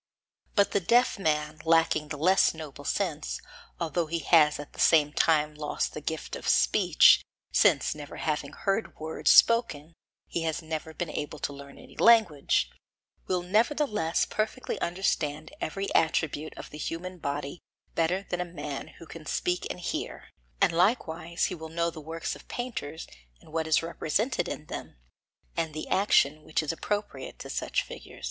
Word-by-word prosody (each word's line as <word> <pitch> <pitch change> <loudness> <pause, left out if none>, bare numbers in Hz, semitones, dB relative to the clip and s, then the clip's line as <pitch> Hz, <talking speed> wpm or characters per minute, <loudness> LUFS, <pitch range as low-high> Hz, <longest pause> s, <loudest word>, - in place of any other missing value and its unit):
But 200 -1 +4
the - - +2
deaf 235 +5 +3
man, 150 -3 -1
lacking 165 -2 +3
the 150 -1 -5
less 180 +3 +4
noble 145 -3 -9
sense, 160 -6 -2 0.4
although 170 0 -1
he 170 +2 -1
has 155 -2 +4
at 145 - -9
the - - -14
same 150 -2 +5
time 150 -2 +3
lost 150 -1 -2
the 150 - -6
gift 160 +1 -4
of - - -3
speech, - - +5 0.3
since - - +4
never 145 -1 -9
having 150 -2 -2
heard 195 +3 -1
words 160 +1 -1
spoken 170 -10 +5 0.3
he 170 - -3 0.2
never 160 0 -4
has 160 - -13
been 175 -3 -3
able 150 +1 -4
to 145 - -3
learn 140 0 -11
any - - -15
language, 220 -11 +4 0.6
will 180 -1 0
nevertheless 215 - +1
perfectly 220 +4 -3
understand 155 -4 -1
every 195 +5 -3
attribute 155 -1 +1
of - - -9
the 150 - -9
human 180 +3 -5
body 140 +2 -4 0.3
better 180 +4 0
than 180 0 -2
a 175 -1 -7
man 140 -2 -4
who 165 - -11
can 160 -1 -11
speak 180 +4 -1
and - - -5
hear; - - -4 0.3
and - - +4
likewise 170 -3 +1
he - - -2
will 160 -2 -7
know 170 +1 0
the 160 - -9
works 165 +2 -4
of - - -15
painters 165 - -5 0.3
and 155 - -18
what 160 -1 -1
is 160 +1 +3
represented 180 - -1
in 150 - -5
them, - - -7 0.6
and 160 -2 -2
the 155 - -5
action 155 -6 +3
which 155 +1 -1
is 155 - -1
appropriate 205 +5 -4
to - - -8
such - - -1
figures. - - -11
160 Hz, 165 wpm, -28 LUFS, 150-185 Hz, 0.6 s, same